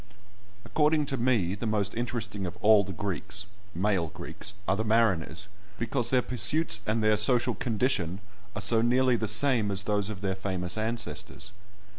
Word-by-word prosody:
According 150 0 +1
to 135 - -1
me, 115 -8 +1
the 105 +3 -4
most 105 -2 -1
interesting 110 -4 -3
of 85 - -8
all 105 -1 +5
the 100 - -7
Greeks 95 +1 -4 0.3
(male 95 -2 0
Greeks) 100 +6 -6
are 95 - +2
the 110 - -2
mariners, 105 -6 +1 0.3
because 120 +1 +1
their 130 -2 +2
pursuits 125 -1 +3
and 110 +1 0
their 110 0 +3
social 120 +3 +3
condition 105 -8 -1 0.4
are 100 - -3
so 115 +2 +5
nearly 125 +1 +3
the 110 -1 -2
same 110 0 +3
as 100 0 0
those 105 0 -1
of 100 -4 -7
their 95 -2 -1
famous 90 -2 -3
ancestors. 110 -3 -4
110 Hz, 165 wpm, -28 LUFS, 100-120 Hz, 0.4 s, all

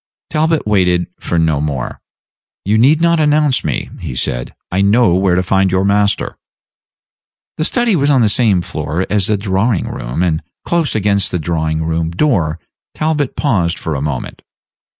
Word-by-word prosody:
Talbot 160 +1 +1
waited 90 -4 +2
for 85 - -2
no 80 -3 +1
more. 70 -5 -4 0.6
"You 105 +3 +2
need 145 +7 +4
not 170 -1 +3
announce 150 -3 +2
me," 75 - -3
he 65 - -6
said; - - -3 0.2
"I 95 +2 +1
know 100 -1 +4
where 95 0 +2
to 90 - +1
find 95 +1 +2
your 95 +1 +1
master." 100 0 +1 1.2
The 155 - 0
study 240 0 +1
was 145 -3 +2
on 135 -3 +4
the 110 - +4
same 105 -4 +2
floor 85 0 -3
as 105 -3 +2
the 105 - +1
drawing 100 +1 0
room, - - -3
and 80 -3 0 0.2
close 170 -6 0
against 100 -2 +1
the - - -1
drawing 80 -1 -1
room 80 0 -1
door 85 - 0 0.4
Talbot 155 -2 -1
paused 90 - 0
for 80 - -4
a 70 - -3
moment. 70 -4 -4
95 Hz, 170 wpm, -16 LUFS, 80-125 Hz, 1.2 s, need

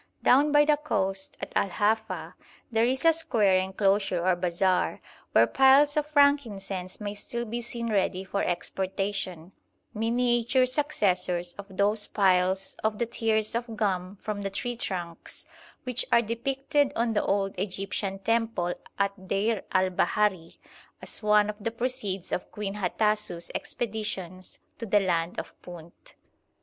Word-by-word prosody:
Down 285 +4 +5
by 295 0 +6
the 300 0 +3
coast 195 -10 -1
at - - -6
Al 200 - +2
Hafa 220 +3 -1 0.4
there 225 0 +3
is 260 +5 -1
a 330 - +7
square 215 -12 +2
enclosure 190 -1 +1
or 185 -1 +4
bazaar 180 +1 0 0.3
where - - +6
piles 270 +2 +5
of 300 -1 0
frankincense 225 -11 +1
may 205 -1 -4
still 235 +3 -5
be 235 +2 -4
seen 235 -1 -4
ready 190 -2 0
for 200 +1 -2
exportation, 190 -1 -3 0.4
miniature 240 +2 +2
successors 185 - 0
of 200 0 -10
those 205 +1 +2
piles 190 -1 +2
of 220 -1 0
the 235 - 0
tears 220 -2 0
of 230 -1 -3
gum 190 -2 -1
from 210 -1 -3
the 195 - -2
tree 245 +5 -3
trunks 175 -7 -6 0.4
which 250 -1 -1
are 235 - +5
depicted 270 +5 0
on 230 0 +1
the 210 - +1
old 195 -1 0
Egyptian 195 0 -2
temple 225 -4 0 0.2
at 200 -1 -2
Deir 205 +2 0
al 185 -1 +2
Bahari 185 -2 0 0.4
as - - -2
one 210 -1 +4
of 210 0 -4
the 230 - +1
proceeds 230 -6 -3
of - - -3
Queen 205 -2 -4
Hatasou's 210 -3 -1
expeditions 195 -5 -4 0.2
to 230 - -5
the 205 +1 +4
land 175 -3 -1
of - - -7
Punt. 170 -1 -13
205 Hz, 145 wpm, -27 LUFS, 190-235 Hz, 0.4 s, a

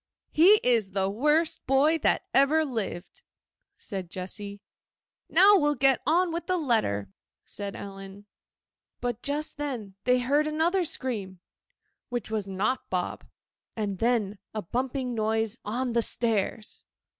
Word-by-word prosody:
'He 385 +7 +6
is 225 -6 +2
the 195 0 0
worst 300 +9 +1
boy 290 +5 +3
that - - +2
ever 305 +4 +4
lived!' 215 -9 -4 0.6
said 190 -5 -6
Jessy. 200 +2 -7 0.7
'Now 390 +4 +7
we'll 295 0 +2
get 270 0 +4
on 345 +3 +3
with 340 0 -4
the 370 -1 +1
letter,' 215 - 0 0.3
said 200 -1 -6
Ellen. 195 0 -9 0.7
But 245 -1 -3
just 300 +2 -2
then 250 -9 -4
they 250 0 +4
heard 285 +5 +1
another 335 +4 +1
scream—which 240 - -7
was 215 -3 -2
not 205 +7 -2
Bob—and 195 +2 -5
then 220 -4 0 0.2
a 215 - -3
bumping 255 +4 -2
noise 220 0 -1
on 245 +4 -2
the 235 0 +2
stairs. 220 -2 -1
240 Hz, 125 wpm, -27 LUFS, 200-295 Hz, 0.7 s, Now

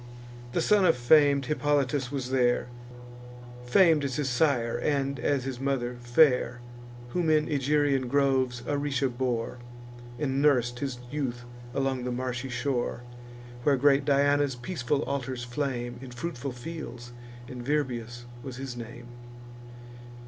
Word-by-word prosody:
The - - +1
son 210 -2 +4
of 165 -7 +4
fam'd 140 +2 +5
Hippolytus 145 -2 0
was 130 -3 -3
there, 125 -2 +2 1.0
Fam'd 160 +3 +5
as 135 -3 -2
his 145 -3 -1
sire, 125 -4 +2
and, 140 -2 -1
as 140 -1 0
his 130 -2 -5
mother, 130 -3 -1
fair; 120 -1 +3 0.5
Whom 170 +4 0
in 155 -1 +3
Egerian 145 -2 +1
groves 130 -2 +1
Aricia 140 -2 0
bore, 120 -1 -2 0.6
And 135 -1 -1
nurs'd 120 -5 +3
his 135 -2 -3
youth 130 -5 -3 0.3
along 135 -2 0
the 125 - -2
marshy 125 +1 -3
shore, 125 -1 -2 0.6
Where 140 +2 +3
great 140 +1 +4
Diana's 145 0 +2
peaceful 140 +1 -2
altars 130 -3 -3
flame, 120 -1 -3
In 130 - -8
fruitful 125 0 -5
fields; 120 -3 -8 0.3
and 125 -1 -7
Virbius 120 -4 -2 0.2
was 130 -1 -7
his 130 -2 -6
name. 120 0 -8
135 Hz, 130 wpm, -28 LUFS, 120-145 Hz, 1.0 s, fam'd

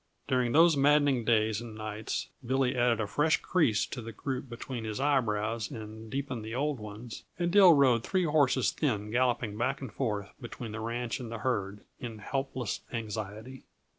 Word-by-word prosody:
During 125 -2 +1
those 165 +3 +6
maddening 140 -3 +3
days 110 -1 +2
and 115 -2 -8
nights 110 0 -4
Billy 130 +1 +1
added 120 -2 +2
a 110 - 0
fresh 150 +10 +2
crease 140 - +2
to 125 - -6
the 115 0 -7
group 130 +3 -4
between 120 0 -6
his 110 +1 -4
eyebrows 115 -5 +1
and 110 0 -8
deepened 135 -3 -3
the 110 +2 -5
old 145 0 -1
ones, 105 +2 -8
and 175 0 0
Dill 190 -3 +8
rode 130 -6 +4
three 185 -2 +1
horses 145 -5 +3
thin 105 -8 -1
galloping 120 -3 +1
back 130 +3 0
and 130 -6 -7
forth 105 -6 -2
between 120 -1 -7
the 110 - -5
ranch 115 +1 -3
and 120 -3 -6
the 115 - -4
herd, 105 -5 -2 0.2
in 115 -3 -6
helpless 130 +1 -3
anxiety. 110 +2 -5
120 Hz, 175 wpm, -30 LUFS, 110-135 Hz, 0.2 s, Dill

